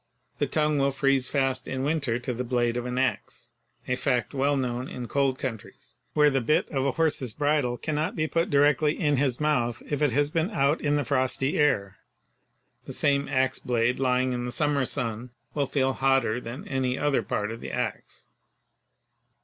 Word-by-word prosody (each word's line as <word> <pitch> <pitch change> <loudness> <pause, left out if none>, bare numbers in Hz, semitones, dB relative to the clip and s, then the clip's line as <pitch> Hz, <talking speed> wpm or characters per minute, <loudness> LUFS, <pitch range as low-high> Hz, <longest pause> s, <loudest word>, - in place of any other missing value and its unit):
The - - +1
tongue 150 -1 +1
will 140 0 +3
freeze 135 -1 +2
fast 135 -2 0
in 130 0 -3
winter 140 -5 0
to 125 +1 -4
the 125 +2 -3
blade 120 -1 0
of 120 0 -3
an 125 0 -3
ax, 130 0 -2 0.4
a 125 - +1
fact 125 0 -1
well 140 +1 +1
known 125 -1 -2
in 125 -1 -6
cold 135 -1 +1
countries 115 -6 -7 0.2
where 150 -1 +5
the 135 -1 +1
bit 150 +6 +2
of 135 -1 0
a 135 - 0
horse's 145 -7 0
bridle 145 -4 +1
cannot 155 +3 -2
be 155 - 0
put 165 +2 0
directly 145 +1 +3
in 145 -4 +2
his 130 -2 +1
mouth 125 -6 0
if 145 - -1
it 145 -3 +3
has 145 +3 +1
been 165 +3 0
out 145 -6 +1
in 145 -1 +1
the 145 -2 0
frosty 130 +1 0
air. 100 -10 +1 0.9
The - - -6
same 140 -1 +2
ax 130 -1 +1
blade 120 0 0
lying 130 -1 +1
in 120 0 -3
the 125 - -4
summer 145 -1 +1
sun 115 0 -2 0.2
will 140 -2 0
feel 135 -1 +1
hotter 135 -3 +1
than 120 +3 -8
any 130 -1 -1
other 145 -4 +1
part 105 0 -2
of 115 - -8
the - - -6
ax. - - -5
135 Hz, 190 wpm, -26 LUFS, 125-145 Hz, 0.9 s, where